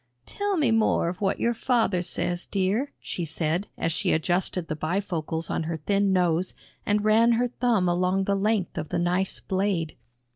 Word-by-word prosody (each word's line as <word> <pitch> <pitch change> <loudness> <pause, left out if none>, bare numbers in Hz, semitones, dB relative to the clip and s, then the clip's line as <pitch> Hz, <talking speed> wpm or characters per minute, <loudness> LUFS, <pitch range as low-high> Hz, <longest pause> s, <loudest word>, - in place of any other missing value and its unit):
"Tell 405 -1 -2
me 285 -7 +2
more 220 -6 +2
of 180 +3 -7
what 195 -1 0
your 235 - +2
father 225 -6 +1
says, 175 0 -3
dear," 205 +8 0
she 175 - -4
said 165 +4 -1
as 165 - 0
she - - 0
adjusted 175 +1 0
the 155 - -3
bifocals 165 -1 -2
on - - 0
her 165 0 -2
thin 200 +5 +1
nose 180 -1 +1 0.3
and 210 0 +1
ran 225 +2 +5
her 245 +2 +2
thumb 235 -6 +1
along 180 +2 +1
the 200 - 0
length 200 -2 0
of 155 - -5
the - - -1
knife's 180 +2 0
blade. 190 -4 -1
190 Hz, 180 wpm, -26 LUFS, 175-215 Hz, 0.3 s, ran